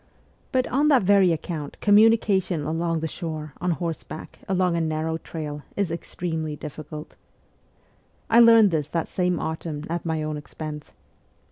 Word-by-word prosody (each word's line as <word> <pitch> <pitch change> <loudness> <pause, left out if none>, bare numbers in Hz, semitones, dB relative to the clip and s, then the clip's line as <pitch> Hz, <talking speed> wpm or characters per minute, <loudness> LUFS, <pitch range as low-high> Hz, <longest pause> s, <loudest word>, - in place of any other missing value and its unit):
But 260 -2 +2
on 285 +4 +2
that 275 -7 +5
very 195 -2 +5
account 155 -2 -4
communication 205 -5 +4
along 165 +1 -1
the 160 - -1
shore, 155 -3 -6
on 180 - 0
horseback, 165 -2 -4
along 185 -2 +2
a 170 - +1
narrow 160 0 -1
trail, 150 -3 -6
is 200 -4 0
extremely 160 -2 -4
difficult. 150 +1 -8 1.1
I 230 - +5
learned 230 -4 +7
this 155 -2 -1
that 165 0 -1
same 180 -2 0
autumn 160 -2 -4
at 170 0 -2
my 160 -2 -1
own 155 0 -3
expense. 150 0 -8
165 Hz, 145 wpm, -24 LUFS, 155-190 Hz, 1.1 s, learned